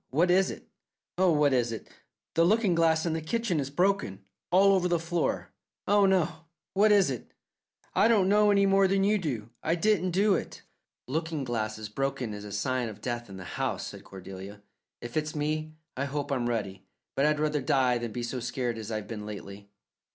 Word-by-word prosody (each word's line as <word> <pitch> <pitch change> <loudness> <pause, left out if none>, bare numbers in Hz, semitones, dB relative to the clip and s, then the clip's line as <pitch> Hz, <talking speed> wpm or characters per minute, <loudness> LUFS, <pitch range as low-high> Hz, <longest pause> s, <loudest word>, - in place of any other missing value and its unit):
What 170 +7 +2
is 190 +1 +4
it? - - -9 0.5
Oh, 185 -2 +5
what 150 -3 +3
is 120 -2 +1
it? 115 - -6 0.5
The 165 - +4
looking 205 +1 +3
glass 165 -1 +3
in 165 - 0
the 160 - -2
kitchen 195 0 -1
is 135 -1 -2
broken. 145 - 0 0.2
All 195 +2 +5
over 185 -2 +2
the 175 -1 +2
floor. 165 0 -2 0.4
Oh, 200 0 +5
oh! 165 -3 0 0.3
What 210 +2 +4
is 200 -8 +5
it?" 125 - -7 0.6
"I 200 +4 +4
don't 210 -5 +4
know 210 +1 +4
any 200 -1 +4
more 195 0 +4
than 195 +1 +2
you 210 +1 +3
do. 120 - -4
I 165 - +1
didn't 185 0 +2
do 195 +3 +3
it." - - -4 0.4
"Lookin' 160 +1 -2
glasses 110 -3 -3
broken 130 0 -2
is 105 0 -7
a 105 - -8
sign 125 +4 -1
of 105 -1 -10
death 120 0 -4
in 95 - -9
the 95 - -8
house," - - -3
said - - -9
Cordelia. 95 +2 -10 0.4
"If 120 0 -8
it's 155 0 -1
me, 155 +1 -2 0.2
I 135 - -1
hope 145 +1 -3
I'm 125 -3 0
ready; 100 -5 -3 0.3
but 140 +2 +2
I'd 150 0 +1
rather 150 -1 0
die 125 -2 +2
than 120 -1 -4
be 120 +2 -4
so 120 +2 -3
scared 120 -1 -3
as 110 -1 -7
I've 110 -2 -4
been 105 -2 -6
lately." 100 -1 -9
150 Hz, 205 wpm, -28 LUFS, 115-180 Hz, 0.6 s, Oh